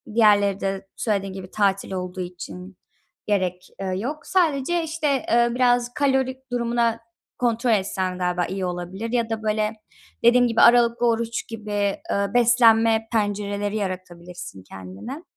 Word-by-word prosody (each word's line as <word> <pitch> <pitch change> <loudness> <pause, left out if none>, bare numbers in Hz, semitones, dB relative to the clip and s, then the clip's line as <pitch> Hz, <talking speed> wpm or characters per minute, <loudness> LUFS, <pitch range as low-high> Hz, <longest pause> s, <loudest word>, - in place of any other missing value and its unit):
diğerleri 205 -3 +4
de 195 0 -3
söylediğin 195 -3 -1
gibi 185 -1 -9
tatil 195 -2 0
olduğu 185 0 -4
için 180 +1 -8 0.5
gerek, 185 -3 -1
eee, 195 - -3
yok. 275 +10 -4
Sadece, 340 -2 +1
işte, 305 -4 -1
eee, 235 0 +4
biraz 245 -1 +2
kalori 265 -2 0
durumuna 235 -1 0 0.4
kontrol 235 0 +1
etsen 190 -3 0
galiba 180 -1 0
iyi 190 +1 -3
olabilir 180 +5 -5
ya 235 -2 0
da, 220 -1 -3
böyle, 215 0 0 0.5
dediğim 245 +1 +5
gibi 230 -1 +2
aralıklı 240 0 +5
oruç 230 0 -1
gibi, 215 -2 -7
eee, 200 0 -1
beslenme 230 -2 +4
pencereleri 205 -1 -1
yaratabilirsin 180 - -6
kendine. 95 - -9
215 Hz, 135 wpm, -23 LUFS, 190-240 Hz, 0.5 s, dediğim